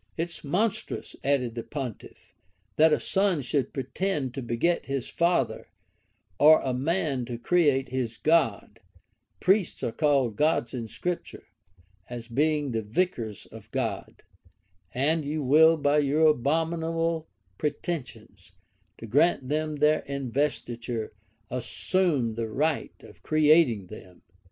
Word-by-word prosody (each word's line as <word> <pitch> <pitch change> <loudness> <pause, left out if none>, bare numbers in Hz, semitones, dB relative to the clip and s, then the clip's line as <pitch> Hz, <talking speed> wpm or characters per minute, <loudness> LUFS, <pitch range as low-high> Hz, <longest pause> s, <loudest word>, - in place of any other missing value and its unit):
] - - -39
"It 170 +1 -2
is - - -13
monstrous," 200 +8 -2
added 130 -4 +1
the 115 - -4
pontiff, 130 -4 -8 0.4
"that 160 +1 +5
a - - +3
son 190 -6 +1
should 135 +1 -1
pretend 135 +1 -2
to 135 - -5
beget 120 +9 0
his 135 -3 -3
father, 170 +1 0 0.7
or 155 +2 +8
a 130 - -2
man 140 0 -1
to 120 0 -5
create 140 -2 +2
his 120 -3 -3
God: 135 -9 +1 0.6
priests 190 0 +1
are - - -1
called 135 -6 +1
gods 150 -6 +1
in 120 -3 -4
Scripture, 175 - -5 0.7
as 120 -1 -7
being 145 +2 0
the 115 -1 -1
vicars 115 - -2
of - - -12
God; - - -4 0.7
and 155 +5 +1 0.2
will 160 +4 +7
you, - - -2
by 145 0 +2
your 150 +2 +2
abominable 165 +3 0 0.3
pretensions 115 - -5 0.4
to - - -9
grant 140 +3 +2
them 155 +1 -1
their 150 +1 +3
investiture, 125 -4 -3 0.4
assume 130 0 0
the 115 0 -3
right 155 +8 -1
of - - -15
creating 155 - +3
them?" 90 0 -13
145 Hz, 130 wpm, -27 LUFS, 120-160 Hz, 0.7 s, or